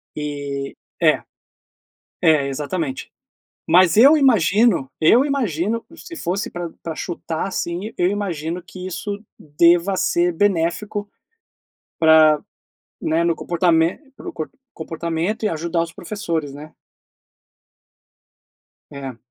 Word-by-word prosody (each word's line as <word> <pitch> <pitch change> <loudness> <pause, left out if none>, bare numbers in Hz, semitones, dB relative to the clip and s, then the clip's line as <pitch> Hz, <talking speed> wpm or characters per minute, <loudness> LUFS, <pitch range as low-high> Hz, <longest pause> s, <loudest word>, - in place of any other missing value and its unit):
E 145 -2 -4 0.3
é, - - +4 1.0
é, 155 -4 +4
exatamente. 145 0 -4 0.6
Mas 175 +1 +5
eu 275 +8 +8
imagino 215 - +3
eu 230 - +5
imagino, 230 - -1
se 335 +1 -10
fosse 190 - -2
pra 175 -1 -5
pra 165 - -4
chutar, 165 0 -4
assim, 185 +3 -4
eu 175 - +2
imagino 175 -4 -3
que 185 +1 -9
isso 200 +3 -5 0.2
deva 170 +5 +3
ser 175 -1 +1
benéfico 205 +3 0 0.9
pra 160 -1 +6 0.6
né, 165 +2 +1
no 170 - +2
comportame 170 -1 +1 0.2
pro - - -8
comp 155 - -5 0.2
comportamento 165 +6 -3
e 215 - +3
ajudar 165 +1 -1
os 165 0 -5
professores, 165 -6 -4
né? 150 +2 -11 2.2
É. 135 -4 -7
170 Hz, 110 wpm, -21 LUFS, 160-200 Hz, 2.2 s, eu